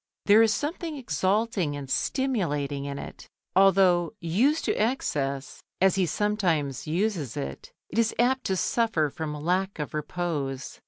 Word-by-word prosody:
There 210 Hz, +2 st, +7 dB
is 225 Hz, -1 st, +4 dB
something 310 Hz, -, -3 dB
exalting 190 Hz, -, 0 dB
and 140 Hz, -1 st, -6 dB
stimulating 150 Hz, -, -1 dB
in 140 Hz, 0 st, -4 dB
it, -, -, -9 dB, 0.3 s
although, 190 Hz, -2 st, +4 dB
used 230 Hz, -, +1 dB
to -, -, +2 dB
excess 140 Hz, -, -1 dB, 0.2 s
as 190 Hz, -1 st, +4 dB
he 185 Hz, -2 st, +1 dB
sometimes 165 Hz, -, 0 dB
uses 170 Hz, -, -1 dB
it, 70 Hz, 0 st, -6 dB, 0.2 s
it -, -, -2 dB
is 230 Hz, -1 st, +2 dB
apt 255 Hz, +2 st, +2 dB
to 190 Hz, -, +1 dB
suffer 180 Hz, -10 st, +1 dB
from 155 Hz, 0 st, -4 dB
lack 180 Hz, +6 st, -1 dB
of 150 Hz, -3 st, -5 dB
repose. 150 Hz, -4 st, -3 dB
180 Hz, 145 wpm, -27 LUFS, 150-220 Hz, 0.3 s, There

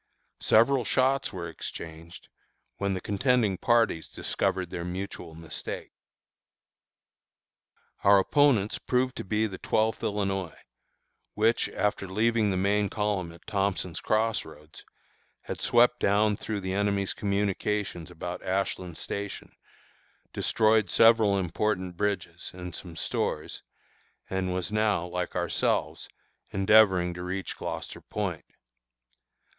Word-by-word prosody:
Several 125 Hz, +3 st, +4 dB
shots 130 Hz, +5 st, +1 dB
were 85 Hz, -2 st, -5 dB
exchanged, 85 Hz, 0 st, -8 dB, 0.5 s
when 100 Hz, -1 st, 0 dB
the 95 Hz, -, -3 dB
contending 105 Hz, 0 st, +2 dB
parties 115 Hz, -8 st, +2 dB
discovered 90 Hz, -2 st, -2 dB
their 85 Hz, -, -4 dB
mutual 90 Hz, -2 st, -6 dB
mistake. 80 Hz, -1 st, -6 dB, 2.1 s
Our 100 Hz, 0 st, +7 dB
opponents 115 Hz, -1 st, +3 dB
proved 125 Hz, 0 st, 0 dB
to -, -, -4 dB
be 105 Hz, +3 st, 0 dB
the 95 Hz, -4 st, -5 dB
Twelfth 110 Hz, 0 st, +1 dB
Illinois, 95 Hz, -4 st, -2 dB, 0.8 s
which, 110 Hz, +2 st, +2 dB
after 105 Hz, -1 st, -1 dB
leaving 110 Hz, +2 st, +2 dB
the 95 Hz, -, 0 dB
main 100 Hz, +2 st, +2 dB
column 100 Hz, -5 st, -1 dB
at 85 Hz, -, -16 dB
Thompson's 100 Hz, -4 st, -1 dB
Cross 110 Hz, +1 st, +1 dB
Roads, 75 Hz, +1 st, -13 dB, 0.6 s
had -, -, -6 dB
swept 120 Hz, +1 st, +4 dB
down 105 Hz, +1 st, +3 dB
through 105 Hz, 0 st, -4 dB
the 95 Hz, 0 st, -3 dB
enemy's 100 Hz, 0 st, 0 dB
communications 100 Hz, -3 st, -1 dB
about 90 Hz, +1 st, -6 dB
Ashland 95 Hz, -2 st, -2 dB
Station, 100 Hz, 0 st, -5 dB, 0.8 s
destroyed 110 Hz, -3 st, +3 dB
several 115 Hz, -2 st, +5 dB
important 95 Hz, 0 st, -1 dB
bridges 90 Hz, -3 st, -2 dB
and 90 Hz, -1 st, -7 dB
some 85 Hz, 0 st, -8 dB
stores, -, -, -2 dB, 0.7 s
and 95 Hz, -1 st, -1 dB
was 90 Hz, +2 st, -2 dB
now, 105 Hz, -5 st, +1 dB
like 90 Hz, 0 st, -4 dB
ourselves, -, -, 0 dB, 0.4 s
endeavoring 95 Hz, -3 st, +4 dB
to 90 Hz, -, -7 dB
reach 90 Hz, +1 st, -4 dB
Gloucester -, -, -6 dB
Point. -, -, -4 dB
100 Hz, 115 wpm, -28 LUFS, 90-110 Hz, 2.1 s, Our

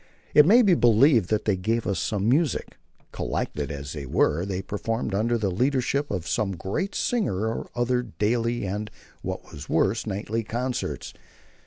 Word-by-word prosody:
It 150 Hz, +1 st, +7 dB
may 235 Hz, +6 st, +7 dB
be 195 Hz, -4 st, +5 dB
believed 120 Hz, -, +4 dB
that 110 Hz, 0 st, 0 dB
they 105 Hz, -, +2 dB
gave 110 Hz, +5 st, -1 dB
us 95 Hz, -4 st, -1 dB
some 105 Hz, +1 st, -1 dB
music. 145 Hz, +3 st, +1 dB, 0.3 s
Collected 75 Hz, -2 st, -3 dB
as 70 Hz, 0 st, -6 dB
they 70 Hz, -3 st, -6 dB
were, 80 Hz, +7 st, +2 dB
they 95 Hz, -1 st, -3 dB
performed 110 Hz, +2 st, -3 dB
under 115 Hz, +4 st, +1 dB
the 100 Hz, -4 st, -1 dB
leadership 135 Hz, +6 st, 0 dB
of 90 Hz, -4 st, -3 dB
some 100 Hz, -3 st, 0 dB
great 105 Hz, -, -3 dB
singer 155 Hz, -, 0 dB
or 110 Hz, -, -4 dB
other 125 Hz, +1 st, +1 dB
daily, 115 Hz, 0 st, -1 dB
and, 105 Hz, +3 st, -3 dB, 0.3 s
what -, -, -6 dB
was 75 Hz, 0 st, -9 dB
worse, 105 Hz, +7 st, +1 dB
nightly 105 Hz, +3 st, -2 dB
concerts. 125 Hz, +3 st, -3 dB
110 Hz, 165 wpm, -25 LUFS, 95-125 Hz, 0.3 s, It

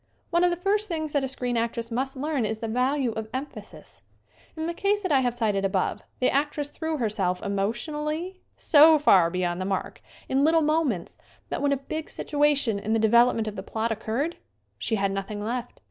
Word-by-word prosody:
One 345 Hz, +1 st, +3 dB
of 360 Hz, -, +5 dB
the 345 Hz, -, 0 dB
first 410 Hz, +4 st, +1 dB
things 315 Hz, -5 st, -3 dB
that 285 Hz, -2 st, +1 dB
a -, -, 0 dB
screen 250 Hz, -2 st, -3 dB
actress 230 Hz, 0 st, -2 dB
must 265 Hz, +4 st, -2 dB
learn 285 Hz, -1 st, -1 dB
is 220 Hz, 0 st, -2 dB
the 225 Hz, -, -4 dB
value 250 Hz, +2 st, +1 dB
of 220 Hz, 0 st, -5 dB
emphasis. 275 Hz, +3 st, -8 dB, 0.6 s
In 315 Hz, -, -2 dB
the 340 Hz, -, -2 dB
case 410 Hz, +3 st, 0 dB
that 370 Hz, -, -1 dB
I 275 Hz, -, +5 dB
have 245 Hz, -2 st, 0 dB
cited 210 Hz, -5 st, 0 dB
above 190 Hz, -1 st, 0 dB, 0.2 s
the 255 Hz, -, +3 dB
actress 290 Hz, +1 st, -1 dB
threw 320 Hz, +1 st, -3 dB
herself 200 Hz, -7 st, -1 dB
emotionally 300 Hz, -, -2 dB
(?) -, -, -44 dB
so 310 Hz, +1 st, +8 dB
far 190 Hz, -, +5 dB
beyond 180 Hz, 0 st, -2 dB
the -, -, -2 dB
mark 190 Hz, -1 st, -3 dB, 0.3 s
in 270 Hz, +1 st, +2 dB
little 320 Hz, +1 st, +4 dB
moments 300 Hz, -, 0 dB, 0.3 s
that -, -, -3 dB
when 285 Hz, 0 st, +2 dB
a 280 Hz, -, +2 dB
big 310 Hz, +4 st, -5 dB
situa 295 Hz, -1 st, +1 dB
tion 225 Hz, -7 st, 0 dB
in 215 Hz, +2 st, -2 dB
the -, -, +3 dB
development 230 Hz, 0 st, +4 dB
of 210 Hz, -, -4 dB
the 190 Hz, -, -5 dB
plot 225 Hz, +3 st, -2 dB
occurred 230 Hz, +9 st, -2 dB, 0.4 s
she 225 Hz, -, 0 dB
had 195 Hz, -1 st, 0 dB
nothing 200 Hz, +2 st, -4 dB
left. 245 Hz, +2 st, -4 dB
255 Hz, 205 wpm, -26 LUFS, 215-300 Hz, 0.6 s, so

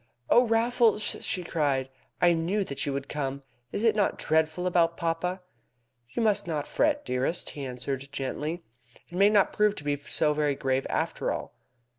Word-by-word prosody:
"Oh, 245 Hz, 0 st, +6 dB
Raffles!" 230 Hz, -1 st, +3 dB, 0.2 s
she 180 Hz, -, 0 dB
cried, 145 Hz, -6 st, 0 dB, 0.3 s
"I 175 Hz, -1 st, +5 dB
knew 175 Hz, +5 st, 0 dB
that 140 Hz, -6 st, -4 dB
you 140 Hz, -, -1 dB
would 140 Hz, 0 st, -4 dB
come. 140 Hz, -1 st, -3 dB, 0.3 s
Is 205 Hz, -, -3 dB
it 225 Hz, -2 st, +4 dB
not 205 Hz, -2 st, +1 dB
dreadful 160 Hz, +3 st, +1 dB
about 170 Hz, -2 st, +2 dB
papa?" 180 Hz, +2 st, -2 dB, 0.7 s
"You 225 Hz, -, -2 dB
must 210 Hz, -5 st, +2 dB
not 150 Hz, -3 st, -2 dB
fret, 290 Hz, 0 st, +1 dB
dearest," 130 Hz, +7 st, -1 dB
he 140 Hz, -2 st, -6 dB
answered 130 Hz, +2 st, -4 dB
gently. 150 Hz, +5 st, -3 dB, 0.5 s
"It 175 Hz, -, -10 dB
may 200 Hz, +3 st, +5 dB
not 205 Hz, -2 st, +3 dB
prove 210 Hz, -1 st, +3 dB
to 145 Hz, -, -7 dB
be 145 Hz, 0 st, 0 dB
so 150 Hz, +2 st, 0 dB
very 150 Hz, -2 st, +1 dB
grave 135 Hz, 0 st, -1 dB
after -, -, -1 dB
all." -, -, -5 dB
165 Hz, 175 wpm, -27 LUFS, 140-200 Hz, 0.7 s, Oh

